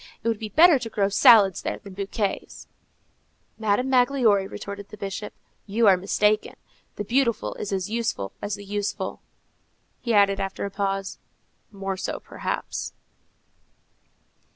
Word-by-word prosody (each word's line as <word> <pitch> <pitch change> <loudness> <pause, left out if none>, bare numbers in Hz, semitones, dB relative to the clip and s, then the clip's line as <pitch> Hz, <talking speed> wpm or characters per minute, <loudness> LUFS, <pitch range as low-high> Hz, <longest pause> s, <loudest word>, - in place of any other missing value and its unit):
It - - -2
would 225 -2 0
be 215 - -5
better 320 - +6
to 235 -2 -5
grow 200 -2 +1
salads 200 -2 +6
there - - -3
than 200 -2 -12
bouquets." 200 +1 -4 0.9
"Madame 220 +3 +1
Magloire," 245 -6 +3
retorted 200 0 -7
the 210 - -11
Bishop, 200 +1 -5 0.4
"you 220 +3 +2
are 195 -2 +7
mistaken. 210 +3 +1 0.4
The 205 - -3
beautiful 235 0 0
is 205 - -4
as 190 -2 -1
useful 220 - -2
as 205 0 -2
the 205 0 -11
useful." 205 0 -3 0.8
He 235 - -3
added 200 -1 +4
after 195 0 -3
a 200 - -5
pause, 195 0 -2 0.5
"More 195 -2 -4
so, - - -4
perhaps." - - -4
205 Hz, 140 wpm, -25 LUFS, 195-225 Hz, 0.9 s, are